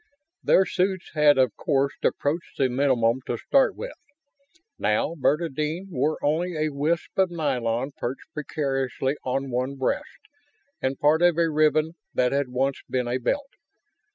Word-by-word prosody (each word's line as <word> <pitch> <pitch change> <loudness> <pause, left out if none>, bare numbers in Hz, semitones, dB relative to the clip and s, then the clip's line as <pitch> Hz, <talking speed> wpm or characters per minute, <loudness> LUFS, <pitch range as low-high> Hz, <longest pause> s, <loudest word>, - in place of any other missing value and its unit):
Their 190 - +5
suits 185 0 -1
had 150 -2 +5
of 130 -4 +3
course 140 -2 +1
approached 155 +4 -1
the 135 -2 +2
minimum 125 -2 +2
to 120 - -1
start 275 - +2
with. - - -6 0.9
Now 105 +9 +1
Bernadine 155 +4 -1
wore 150 +1 0
only 160 +4 0
a 155 0 +1
wisp 155 +6 -1
of 190 -1 +4
nylon 130 -6 -1
perched 130 +6 -6
precariously 135 -3 -2
on 135 +1 -2
one 130 +3 -1
breast 130 -1 -1 0.7
and 130 +1 -1
part 155 +2 +4
of 175 -2 +4
a 165 -1 +2
ribbon 155 +1 +3 0.2
that 125 -1 +2
had 140 -1 0
once 135 +2 -1
been 125 -1 -1
a 125 +2 -1
belt. 275 - -1
145 Hz, 150 wpm, -25 LUFS, 130-160 Hz, 0.9 s, Their